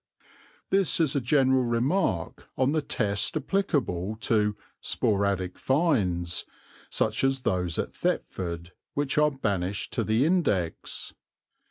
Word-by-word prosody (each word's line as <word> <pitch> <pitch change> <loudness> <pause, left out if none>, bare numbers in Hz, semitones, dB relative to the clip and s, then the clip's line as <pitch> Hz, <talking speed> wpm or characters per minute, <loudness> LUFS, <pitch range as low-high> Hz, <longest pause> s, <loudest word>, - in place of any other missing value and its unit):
This 195 -3 +3
is 155 -4 +3
a 140 - +2
general 130 0 +3
remark 120 - 0
on 130 +1 +2
the 155 0 +1
test 105 +1 0
applicable 135 - -1
to 105 -3 +2 0.2
"sporadic 100 -3 0
finds," 100 - +1 0.5
such 110 +3 +1
as 135 0 +2
those 90 -6 0
at - - -1
Thetford, 85 -1 -3 0.2
which 145 0 +1
are 150 0 +5
banished 100 -8 -2
to - - 0
the 110 +5 +2
index. 145 - 0
115 Hz, 120 wpm, -27 LUFS, 95-145 Hz, 0.5 s, are